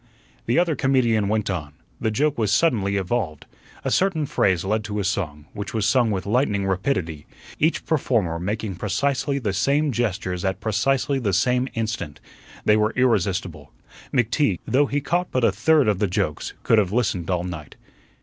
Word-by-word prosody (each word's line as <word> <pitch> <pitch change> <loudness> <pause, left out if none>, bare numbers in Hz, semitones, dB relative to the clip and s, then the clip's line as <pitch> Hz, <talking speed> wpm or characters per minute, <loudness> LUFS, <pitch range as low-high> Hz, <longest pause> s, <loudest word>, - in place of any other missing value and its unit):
The 120 - +2
other 170 -2 +2
comedian 120 -6 +2
went 105 0 0
on. 75 -5 -5 0.3
The 110 - 0
joke 145 +7 +1
was 105 -3 +1
suddenly 105 -7 +2
evolved. 95 -5 -2 0.4
A - - 0
certain 180 -5 +2
phrase 95 -9 +1
led 105 +2 0
to 105 0 -4
a 100 - 0
song, 75 -6 -2
which 105 +1 -6
was 110 -2 +1
sung 125 -4 +3
with 95 -3 -2
lightning 105 -3 +1
rapidity, 90 - -2 0.3
each 160 +2 +1
performer 115 - 0
making 100 +1 -3
precisely 140 - 0
the 110 -8 -2
same 140 +9 +1
gestures 95 -6 -2
at 95 0 -1
precisely 130 +6 0
the 105 -6 -1
same 125 +7 +2
instant. 110 -9 -3 0.5
They 105 - +5
were 105 0 +1
irresistible. 105 - 0 0.4
McTeague, 120 - +1
though 140 +3 +2
he 145 +1 -1
caught 175 +5 -1
but 130 - -1
a 115 - +5
third 155 +5 +3
of 105 -3 +1
the 105 - +2
jokes, 90 -5 -2
could 115 - +4
have 95 -3 0
listened 100 -7 0
all 90 -2 0
night. 85 -5 -7
110 Hz, 175 wpm, -23 LUFS, 95-130 Hz, 0.5 s, They